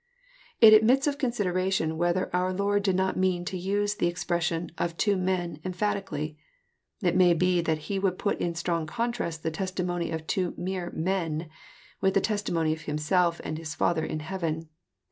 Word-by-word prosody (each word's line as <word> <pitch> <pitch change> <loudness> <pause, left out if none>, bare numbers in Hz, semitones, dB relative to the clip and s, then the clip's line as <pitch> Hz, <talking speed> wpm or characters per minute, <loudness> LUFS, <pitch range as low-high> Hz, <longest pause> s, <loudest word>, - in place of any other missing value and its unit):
It 220 -2 +10
admits 235 +5 +5
of 285 -1 -1
consideration 190 - 0
whether 175 +2 0
onr 185 +1 0
Lord 205 0 +2
did 195 -2 +1
not 190 0 0
mean 185 -1 +1
to 185 - -4
use 200 +3 0
the 190 - 0
expression 175 -1 -1
" - - -32
of 170 -1 -2
two 205 -2 +2
men 180 -4 -1
" - - -32
emphatically. 180 -5 -2 0.6
It 175 -1 +2
may 180 -2 +5
be 180 +1 +2
that 160 -2 0
He 200 -1 -1
would 190 -2 0
put 205 - -1
in 170 -1 -1
strong 170 -1 -1
contrast 235 -6 -3
the 160 - -1
testimony 175 0 -2
of 160 -1 -4
two 180 +1 -1
mere 180 -1 -3
men, 165 -2 -1 0.5
with 190 0 +2
the - - +6
testimony 175 -7 0
of 160 - -7
Himself 170 +4 +1
and 155 - -4
his 155 -2 -6
Father 165 -2 +1
in 155 - -3
heaven. 165 -2 -3
180 Hz, 185 wpm, -27 LUFS, 165-190 Hz, 0.6 s, It